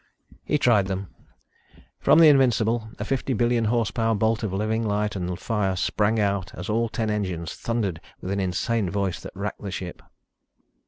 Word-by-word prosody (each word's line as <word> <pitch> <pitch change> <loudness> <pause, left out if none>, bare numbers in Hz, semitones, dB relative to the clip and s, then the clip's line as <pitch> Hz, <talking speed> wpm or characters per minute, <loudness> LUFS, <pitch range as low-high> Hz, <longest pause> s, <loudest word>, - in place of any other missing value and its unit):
He 150 - +1
tried 115 -8 +3
them. 95 0 -4 0.9
From - - +5
the 165 -1 +8
Invincible 120 -5 +3
a - - -4
fifty 135 0 -1
billion 120 0 +2
horsepower 115 0 +1
bolt 110 +2 +1
of 110 -4 -2
living 110 +3 0
light 105 -1 -1
and 90 -1 -3
fire 100 -4 0
sprang 105 +4 +1
out 100 -3 -1
as - - -6
all 115 +2 +1
ten 110 -2 -1
engines 90 -6 -2
thundered 105 -8 -2 0.2
with 95 - -5
an 100 - -1
insane 95 +3 0
voice 95 -3 -1
that - - -10
racked 100 +2 -4
the 100 - -5
ship. 90 -1 -6
105 Hz, 170 wpm, -25 LUFS, 95-115 Hz, 0.9 s, the